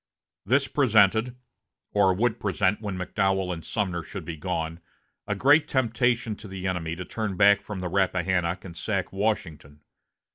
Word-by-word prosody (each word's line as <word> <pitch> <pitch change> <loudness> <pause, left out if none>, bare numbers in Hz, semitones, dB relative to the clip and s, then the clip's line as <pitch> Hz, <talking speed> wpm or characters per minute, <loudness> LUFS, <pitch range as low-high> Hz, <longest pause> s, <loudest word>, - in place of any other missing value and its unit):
This 135 +2 +3
presented 115 -3 +3 0.6
(or 100 -2 +4
would 110 +5 0
present 100 +1 0
when 100 -4 -4
McDowell 95 0 0
and 80 -2 -7
Sumner 95 -6 -2
should 95 0 -8
be 80 - -5
gone) 80 0 -3 0.5
a 105 - -1
great 145 +8 +4
temptation 120 -2 +1
to 110 - -11
the 95 -1 -7
enemy 85 -3 -2
to 90 +1 -6
turn 110 -4 -4
back 100 +1 +5
from 100 -3 -6
the 90 - -2
Rappahannock 95 -1 0
and 85 -3 -9
sack - - -3
Washington. 80 -8 -3
95 Hz, 155 wpm, -26 LUFS, 90-110 Hz, 0.6 s, back